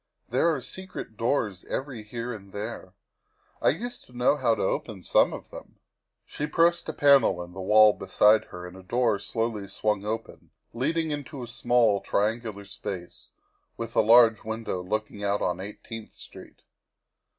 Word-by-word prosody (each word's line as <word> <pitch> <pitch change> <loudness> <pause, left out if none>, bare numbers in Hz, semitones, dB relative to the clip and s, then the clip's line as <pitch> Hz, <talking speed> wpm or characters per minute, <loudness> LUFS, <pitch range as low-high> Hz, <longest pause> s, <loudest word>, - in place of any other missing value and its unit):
There 135 +8 +3
are 135 - -5
secret 185 -11 -7
doors 110 -5 -1
every 130 -4 -4
here 115 +3 -5
and 100 -3 -11
there. 100 -3 -6 0.7
I - - +5
used 240 +10 -4
to 125 - -15
know 125 +4 +4
how 125 -6 +2
to 105 - -2
open 95 -1 -2
some - - +4
of - - -9
them. - - -11 0.2
' - - -59
' - - -56
She 150 - -4
pressed 170 +2 +2
a - - 0
panel 140 -10 +5
in 90 0 -12
the 95 - -7
wall 105 +2 +6
beside 105 +3 +3
her 90 0 -9
and 90 0 -10
a 95 - -11
door 115 +2 +1
slowly 115 -1 -3
swung 105 0 -1
open, 110 +2 -5 0.2
leading 160 +6 0
into 145 -2 -5
a - - -7
small, 120 -4 +2
triangular 105 -1 -1
space, 90 -2 -8 0.4
with 115 0 -6
a - - +6
large 115 0 +6
window 110 -4 -3
looking 105 +2 -3
out 100 0 0
on 90 0 -1
Eighteenth 105 +3 -8
Street. - - -13
110 Hz, 175 wpm, -27 LUFS, 100-125 Hz, 0.7 s, wall